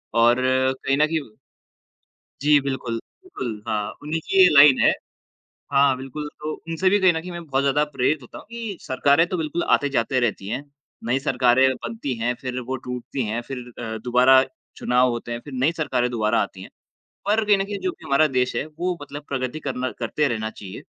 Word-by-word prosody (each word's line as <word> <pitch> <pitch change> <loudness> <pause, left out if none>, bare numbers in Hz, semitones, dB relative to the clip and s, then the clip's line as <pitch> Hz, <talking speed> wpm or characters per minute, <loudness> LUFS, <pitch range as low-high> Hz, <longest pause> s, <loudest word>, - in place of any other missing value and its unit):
और 120 +1 +5 0.5
कहीं 135 0 +1
न 150 - +5
कहीं 155 -8 -4 1.1
जी, 150 0 +5
बिल्कुल, 130 -4 -3 0.3
बिल्कुल, 120 - -6
हाँ, 105 -1 -1
उन्हीं 155 +2 -2
की 195 - -2
ये 185 - +9
लाइन 140 -2 +8
है। - - +6 0.8
हाँ, 140 -1 +4
बिल्कुल, 135 +3 -6
तो 155 +1 -3 0.2
उनसे 185 +3 +1
भी 205 - +4
कहीं 185 -2 +5
न 160 - -3
कहीं 180 - -8
मैं 170 0 -7
बहुत 135 -1 0
ज़्यादा 140 +2 +2
प्रेरित 145 +5 +1
होता 125 - -11
हूँ - - -13
कि 230 -5 -5
सरकारें 140 +4 +2
तो 185 - -2
बिल्कुल 160 +2 -2
आते-जाते 130 -2 +1
रहती 105 -4 -1
हैं, 125 +5 -3 0.4
नई 125 +3 +1
सरकारें 130 -1 +3
बनती 180 - -5
हैं, 120 +2 0
फिर 125 -1 -4
वो 130 +2 -4
टूटती 125 +1 -5
हैं, 115 +3 -2
फिर 135 - -4 0.2
अ, 110 -2 -4
दोबारा 125 +2 +6 0.3
चुनाव 125 +1 +2
होते 120 0 -4
हैं, 120 - -4
फिर 145 - -10
नई 135 +6 +2
सरकारें 130 -7 -1
दोबारा 110 -3 +1
आती - - -7
हैं। - - -11 0.6
पर 215 +2 +3
कहीं 205 -1 +5
न 195 - 0
कहीं 205 0 -5
जो 370 - -1
भी 345 - -16
हमारा 140 +3 +4
देश 125 0 +1
है, - - -1
वो 175 +3 -3
मतलब 145 +1 -8
प्रगति 130 +2 -3
करना 130 -3 -3
करते 135 +5 0
रहना 110 -3 -2
चाहिए, 100 -3 -10
135 Hz, 200 wpm, -23 LUFS, 125-155 Hz, 1.1 s, ये